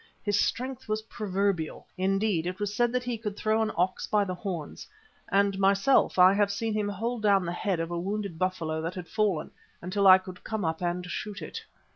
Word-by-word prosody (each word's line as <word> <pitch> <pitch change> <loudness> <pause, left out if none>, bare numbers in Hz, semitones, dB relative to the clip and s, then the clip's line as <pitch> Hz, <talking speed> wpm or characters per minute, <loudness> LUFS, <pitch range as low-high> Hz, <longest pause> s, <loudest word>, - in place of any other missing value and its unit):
His 205 -2 +1
strength 255 -2 -2
was 215 0 -1
proverbial; 195 -6 -2
indeed, 195 -2 +1
it 185 +2 -4
was 205 0 -2
said 240 +2 +2
that 250 0 -1
he 245 -2 -3
could 210 -2 -5
throw 220 +1 +1
an 220 -1 0
ox 180 +2 0
by 210 -1 +3
the 185 -2 -3
horns, 175 -4 -6 0.4
and 200 0 +2
myself 195 +6 +3
I 185 +1 +8
have 200 0 +2
seen 220 +2 -2
him 210 -1 0
hold 225 +4 -3
down 200 -3 +3
the 170 - -2
head 180 0 -1
of 165 +1 -3
a 170 - -2
wounded 195 -2 -3
buffalo 165 -4 -1
that 165 +2 -4
had 180 -2 -6
fallen, 210 -7 0 0.3
until 195 +3 +1
I 185 0 +10
could 185 -1 -11
come 220 -4 -3
up 160 +1 -2
and 175 0 -1
shoot 200 +3 -5
it. - - -7
195 Hz, 210 wpm, -28 LUFS, 180-215 Hz, 0.4 s, I